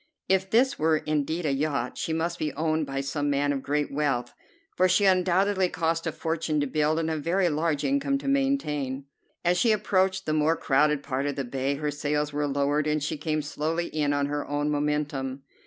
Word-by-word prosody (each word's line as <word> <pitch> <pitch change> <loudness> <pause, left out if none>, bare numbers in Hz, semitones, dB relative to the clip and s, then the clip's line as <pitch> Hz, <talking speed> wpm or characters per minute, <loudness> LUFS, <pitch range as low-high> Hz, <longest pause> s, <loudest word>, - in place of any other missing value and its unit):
If 190 0 +2
this 250 +5 +3
were 160 0 +3
indeed 155 +3 -1
a 145 - +2
yacht 140 -3 -1
she - - -3
must 170 +2 -1
be 155 -1 -1
owned 155 0 0
by 135 0 -2
some 145 +1 -2
man 145 0 +1
of 135 - -3
great 145 +1 -1
wealth, 135 -5 -1 0.4
for 185 +1 +3
she 200 +3 +3
undoubtedly 190 +1 +3
cost 165 -1 -1
a - - 0
fortune 160 -1 -1
to 145 - +1
build 155 +2 +1
and 165 -1 0
a 160 - -1
very 175 +4 +1
large 150 -1 0
income 275 0 +1
to 275 - -7
maintain. 150 - 0 0.4
As 175 +1 +3
she 230 - +4
approached 190 -2 +1
the 155 - 0
more 155 +1 +3
crowded 150 0 +2
part 140 0 -2
of 145 - -2
the 140 - -2
bay, 135 +3 -1
her 150 +1 -2
sails 150 0 -1
were 145 0 0
lowered 145 +2 0
and 150 -1 0
she 150 - -2
came 155 0 -2
slowly 160 +3 -2
in 150 -2 0
on 145 0 +1
her 145 +1 -2
own 145 +1 -1
momentum. 145 -2 -2
150 Hz, 205 wpm, -26 LUFS, 145-170 Hz, 0.4 s, she